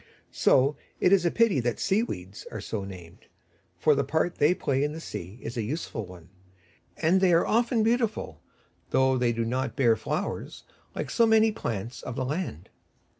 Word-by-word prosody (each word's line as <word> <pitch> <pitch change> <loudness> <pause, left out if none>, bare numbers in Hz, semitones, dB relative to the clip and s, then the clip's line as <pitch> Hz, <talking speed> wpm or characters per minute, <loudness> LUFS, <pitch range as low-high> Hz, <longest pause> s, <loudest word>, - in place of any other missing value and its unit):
So 135 +3 +3 0.2
it 180 - +4
is 185 -3 +4
a - - +4
pity 230 - +3
that 120 -1 -1
Sea 195 +3 +2
weeds 95 - -6
are 110 - -5
so 105 0 -4
named, 90 -4 -11 0.5
for - - +4
the - - +1
part 160 +2 -1
they 150 +5 +4
play 135 -4 0
in 150 +1 -1
the 160 - -6
sea 95 - -7
is 120 +2 -6
a - - 0
useful 115 - -4
one; 90 -2 -13 0.7
and 180 +4 +3
they 185 -2 +4
are 165 - +4
often 230 0 +2
beautiful, 230 -2 -1 0.5
though 130 0 +3
they 120 -1 +2
do 115 0 -1
not 130 +3 -2
bear 120 -4 +4
flowers - - -4 0.3
like - - -4
so 230 - +4
many 220 0 +5
plants 115 - -5
of 120 - -6
the 130 -1 -2
land. 140 - -4
135 Hz, 185 wpm, -27 LUFS, 115-190 Hz, 0.7 s, many